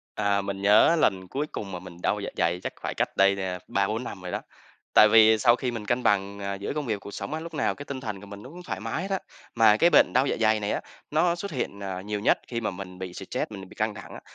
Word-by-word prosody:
À, 100 -1 +1
mình 100 0 -5
nhớ 105 +11 +6
lần 95 - +1
cuối 140 +8 -2
cùng 100 -2 -5
mà 90 - -4
mình 90 -1 -11
đau - - +1
dạ - - -4
dày 85 +2 +1
chắc - - -4
phải - - -3
cách - - -2
đây 100 0 +4
nè 95 -2 -3
3-4 105 +5 0
năm 95 -5 -7
rồi 90 -1 -6
đó. - - -2 0.5
Tại 105 - +8
vì 110 0 +7
sau 120 +2 +5
khi 125 0 -2
mình 115 -3 -6
cân 120 +3 0
bằng, 100 -1 +1
ờ, 100 0 -3
giữa 100 +1 -4
công 150 -2 -3
việc 105 -4 -2
cuộc 100 - -9
sống 145 - -5
á, 160 - -3
lúc 165 0 -8
nào 150 - 0
cái 145 - -9
tinh 140 -2 -6
thần 105 -5 -5
của 100 - -12
mình 100 0 -10
nó 130 - -11
cũng 180 +3 -10
thoải 180 - -5
mái 170 - -3
hết 195 - -5
á, 195 - +1 0.4
mà 110 -2 +6
cái 170 +9 +4
bệnh - - +5
đau 130 +2 +3
dạ - - 0
dày 110 -1 +3
này 105 0 -1
á, - - -1 0.3
nó 170 +3 +2
xuất 200 +3 -6
hiện, 110 -7 -3
ờ, 95 -2 -4
nhiều 105 +2 -4
nhất - - +3
khi 115 -1 -3
mà 110 - -1
mình 90 -1 -9
bị 95 -1 -6
stress, - - -4
mình 95 -2 -8
bị - - -14
căng 110 0 -1
thẳng 100 - -10
á. - - -9
105 Hz, 295 wpm, -26 LUFS, 100-125 Hz, 0.5 s, Tại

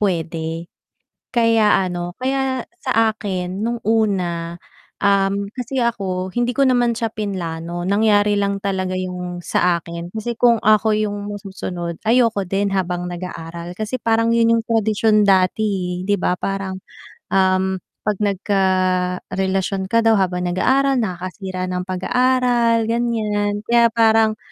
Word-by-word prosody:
pwede. 165 -3 -2 0.7
Kaya, 225 -5 +3
ano, 175 0 -5
kaya 265 -1 -1 0.2
sa 225 -1 +2
akin 190 -2 -4
nung 235 +2 -1
una, 180 -6 0 0.4
um, 200 0 +2
kasi 255 +1 -5
ako, 190 -6 -1
hindi 240 0 0
ko 275 - +3
naman 245 -3 +2
siya 225 -1 -2
plinano, 175 -4 -4
nangyari 205 +1 +3
lang 200 0 0
talaga 185 -2 -1
yung 180 -1 -4
sa 175 0 +2
akin. 170 0 -7
Kasi 220 +4 -4
kung 235 0 +4
ako 215 0 +3
yung 205 -1 -2
masusunod, 185 -4 -6
ayoko 230 -3 +3
din 195 +1 0
habang 180 -2 -1
nag-aaral, 170 -1 -7
kasi 220 +3 -3
parang 230 0 +2
yun 230 0 +4
yung 225 - -2
tradisyon 220 -1 +2
dati, 185 -1 +1
eh, 185 - -7
di 205 - +3
ba? 180 - 0
Parang, 195 -1 -3 0.5
um, 190 0 +2 0.3
'pag 210 -2 0
nagkarelasyon 190 -1 0
ka 230 - +4
daw 225 0 +5
habang 180 -2 0
nag-aaral, 270 +10 +2
nakakasira 185 -1 -4
ng 180 0 -2
pag-aaral, 240 +3 +2
ganyan. 215 -3 0
Kaya 235 -1 +4
parang, 220 -1 +3
200 Hz, 130 wpm, -20 LUFS, 185-225 Hz, 0.7 s, daw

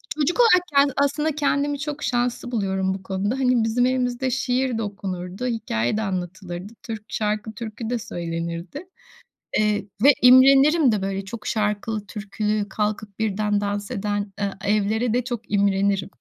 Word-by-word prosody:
çocuk 310 - 0
olarak 400 -7 +6
kendi 280 -1 +5
aslında 290 +2 +1
kendimi 285 -1 0
çok 295 0 -4
şanslı 245 0 -1
buluyorum 190 -3 0
bu 190 0 -7
konuda. 195 +5 -2
Hani 250 -3 +3
bizim 230 +2 +2
evimizde 255 0 0
şiir 250 -1 0
de - - -2
okunurdu, 195 +2 -5
hikâye 210 - -1
de 220 - -1
anlatılırdı. 185 0 -5
Türk 220 -2 -6
şarkı 210 0 -2
türkü 225 0 -6
de 245 -1 -1
söylenirdi. 170 - -5 0.7
Eee, 210 -2 +1 0.2
ve 285 +2 +8
imrenirim 270 +3 +7
de 205 -2 -1
böyle 195 0 -2
çok 220 +2 -8
şarkılı 210 0 -1
türkülü, 210 0 -2
kalkıp 210 -1 -3
birden 210 -1 0
dans 205 0 -3
eden, 205 0 -2
ııı, 200 -1 -1
evlere 215 +3 +1
de 250 -1 +1
çok 240 -3 -5
imrenirim. 200 -1 +1
215 Hz, 150 wpm, -23 LUFS, 200-250 Hz, 0.7 s, ve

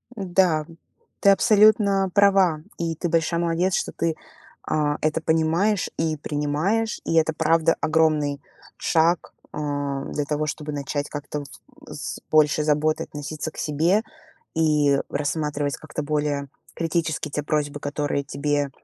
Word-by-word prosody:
Да, 180 -5 +2 0.5
ты 200 - +5
абсолютно 200 -1 +4
права, 195 -6 +4 0.2
и 165 -1 -2
ты 175 - -2
большая 165 0 +1
молодец, 170 +2 +1
что - - -1
ты, 165 -1 -1 0.5
а, 150 -1 0
это 155 +1 0
понимаешь 165 +6 +1
и 160 -1 0
принимаешь, 150 +10 -1
и - - 0
это 160 0 +3
правда 165 +1 +2
огромный 155 -3 +2 0.4
шаг, 165 +1 +1 0.2
а, 145 -2 -3
для 145 - -3
того, 150 +1 -1
чтобы 150 0 -4
начать 145 0 -3
как-то 145 0 -5
в - - -12 0.5
с - - -5
с - - -12
большей 155 0 +4
заботой 155 +1 +1
относиться 150 +2 -6
к - - -18
себе 160 +7 +2 0.5
и 150 -3 +3
рассматривать 150 -1 -2
как-то 150 -1 -6
более 145 -1 -1 0.3
критически 160 -2 -1
те 150 0 -3
просьбы, 145 -1 -1
которые 145 0 -2
тебе 145 0 -1
155 Hz, 135 wpm, -24 LUFS, 145-165 Hz, 0.5 s, ты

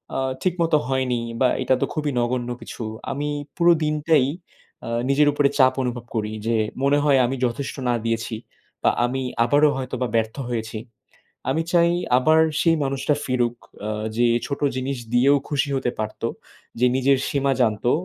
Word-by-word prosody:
আ - - 0 0.2
ঠিকমতো 170 -4 +2
হয়নি 130 -3 0 0.2
বা, 130 - +5
এটা 130 +1 +3
তো - - +3
খুবই 150 -2 -1
নগণ্য 120 0 -1
কিছু। 115 - -7 0.3
আমি 145 +2 -3 0.3
পুরো 170 0 +5
দিনটাই 150 -2 +2 0.6
আ - - -4 0.2
নিজের 145 +2 +4
উপরে 145 -1 +2
চাপ 130 -1 +5
অনুভব 120 -1 -4
করি 105 -1 -1 0.2
যে, 115 -1 +2 0.3
মনে 140 +1 +4
হয় 140 -3 +4
আমি 130 +2 -2
যথেষ্ট 125 +3 -3
না - - +3
দিয়েছি 115 0 -1 0.5
বা, - - +5 0.2
আমি 130 +2 -2 0.2
আবারও 145 +5 +4
হয়তোবা 130 -1 -3
ব্যর্থ 110 0 0
হয়েছি। 110 -2 -3 0.7
আমি 160 +5 +1
চাই 170 0 +5 0.3
আবার 155 +5 +4 0.2
সেই 165 -1 +4
মানুষটা 135 +2 0
ফিরুক, 120 -2 0 0.3
আ - - -2 0.3
যে 120 0 +4 0.2
ছোট 140 - -4 0.2
জিনিস 130 +1 -2 0.2
দিয়েও 140 +4 +5
খুশি 145 -1 0
হতে 130 -2 -1
পারত। 110 0 -4 0.6
যে 125 - +4
নিজের 135 +1 +3
সীমা 140 -1 +1
জানতো, 110 +1 +1
130 Hz, 165 wpm, -23 LUFS, 120-145 Hz, 0.7 s, বা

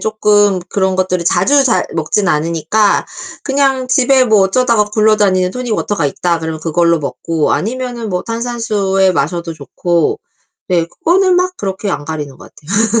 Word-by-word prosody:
쪼끔 205 -3 +2
그런 190 -1 0
것들을 185 -2 -1
자주 270 +13 +3
잘 240 - +1
먹지는 175 +5 0
않으니까 165 +7 +1 0.4
그냥 270 -2 0
집에 260 0 +3
뭐 220 -3 +3
어쩌다가 230 +2 +2
굴러다니는 210 -3 +2
토닉 245 0 -3
워터가 205 -7 -2
있다 170 +4 -1
그러면 160 -1 -5
그걸로 170 +1 +1
먹고 155 +2 -2
아니면은 240 -1 -3
뭐 180 0 -2
탄산수에 225 -5 0
마셔도 170 +1 -2
좋고 165 +2 -1 0.5
네 170 -2 +1
그거는 365 - +1
막 365 0 0
그렇게 195 0 -4
안 145 -3 -3
가리는 150 -3 -6
것 - - -15
같아요. 195 +10 -1
195 Hz, 350 characters per minute, -14 LUFS, 170-230 Hz, 0.5 s, 자주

